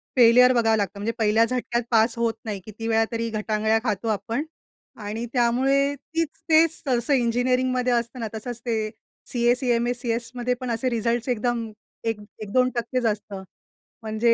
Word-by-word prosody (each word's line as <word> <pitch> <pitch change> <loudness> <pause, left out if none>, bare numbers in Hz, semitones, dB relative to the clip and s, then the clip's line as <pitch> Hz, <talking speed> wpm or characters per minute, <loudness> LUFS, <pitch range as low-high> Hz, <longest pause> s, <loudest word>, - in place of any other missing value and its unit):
Failure 250 +1 +7
बघावं 225 -2 +3
लागतं. 200 -3 -1
म्हणजे 215 +3 -1
पहिल्या 220 +1 +4
झटक्यात 245 -1 -1
पास 225 +1 +3
होत 230 -1 +1
नाही. 205 -3 -3
किती 220 +1 -7
वेळा 225 0 +3
तरी 230 0 -2
ग 215 - -1
टांगळ्या 220 +1 +2
खातो 215 -1 -2
आपण, 225 +6 -1 0.6
आणि 215 +2 -4
त्यामुळे 270 +3 +2
तीच 320 +3 -3 0.2
ते 320 +1 +7
सहसा 270 -4 -1
इंजिनिअरिंगमध्ये 250 0 +1
असत 235 +1 -1
ना, 225 - -2
तसंच 235 +2 -6
ते 220 -2 -1 0.4
सी-ए, 240 0 +3
सी-एम-ए, 245 -1 +1
सी-एसमध्ये 240 +1 -2
पण 250 -2 -2
असे 235 +3 0
रिझल्ट्स 235 +1 -1
एकदम 235 -1 -1 0.3
एक 225 -2 -1 0.2
1-2% 250 +3 0
च - - -3
असतं, 205 -3 -2 0.6
म्हणजे 220 +2 +2
235 Hz, 160 wpm, -24 LUFS, 225-250 Hz, 0.6 s, Failure